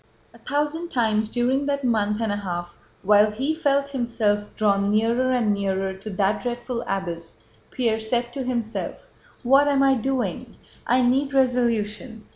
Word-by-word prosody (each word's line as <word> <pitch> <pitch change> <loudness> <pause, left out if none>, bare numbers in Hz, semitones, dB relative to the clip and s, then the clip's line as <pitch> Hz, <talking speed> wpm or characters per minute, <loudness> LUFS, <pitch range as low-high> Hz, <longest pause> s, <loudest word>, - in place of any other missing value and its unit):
A - - -17
thousand 300 +4 -2
times 220 -4 +1
during 255 +4 0
that 280 -1 -1
month 215 -3 +1
and 220 -2 0
a 205 - -1
half 175 -3 -5 0.3
while 210 +2 +5
he 265 +9 -2
felt 280 -3 +1
himself 225 -6 0
drawn 200 -1 +2
nearer 230 +4 +2
and 235 -5 +2
nearer 195 -1 -1
to 190 +3 -9
that 195 +1 0
dreadful 240 0 -4
abyss, 170 -7 -4 0.3
Pierre 230 -3 0
said 240 +2 -1
to 275 - -4
himself: 245 - -4 0.3
"What 270 +4 +5
am 280 -1 +3
I 270 0 +5
doing? 245 -2 -2 0.3
I 250 +1 +3
need 270 +3 +1
resolution. 235 -3 0
235 Hz, 155 wpm, -23 LUFS, 210-260 Hz, 0.3 s, while